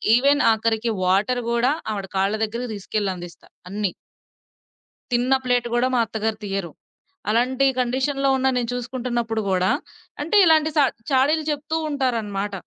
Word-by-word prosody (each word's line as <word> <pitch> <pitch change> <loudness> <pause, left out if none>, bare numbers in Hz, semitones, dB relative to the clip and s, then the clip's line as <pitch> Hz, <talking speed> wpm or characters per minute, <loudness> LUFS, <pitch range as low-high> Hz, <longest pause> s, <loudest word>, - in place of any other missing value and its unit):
Even 280 +4 +3
ఆఖరికి 225 +1 0 0.2
water 200 +7 +2
గూడా 235 +3 +2 0.2
ఆవిడ 200 -2 -4
కాళ్ళ 195 +2 +1
దగ్గరికి 235 +2 -5
దీసుకెళ్ళి 200 0 -2
అందిస్తా, 175 -1 -11 0.2
అన్నీ. 200 -2 -2 1.2
తిన్న 245 +2 +3
ప్లేటు 245 -1 +1
గూడా 245 +1 +2
మా 245 - +3
అత్తగారు 220 0 -2
తియ్యరు. 195 -4 -3 0.6
అలాంటి 255 +4 +2
కండిషన్‌లో 270 +3 0
ఉన్నా 265 0 +2
నేను 235 - -2
చూసుకుంటన్నప్పుడు 240 -2 -2
గూడా 185 0 +2 0.5
అంటే, 335 +8 0
ఇలాంటి 315 -1 +4
సా 290 - +6 0.3
చాడీలు 290 +4 +3
చెప్తూ 300 +2 -2
ఉంటారనమాట. 220 -8 -1
240 Hz, 135 wpm, -22 LUFS, 210-265 Hz, 1.2 s, సా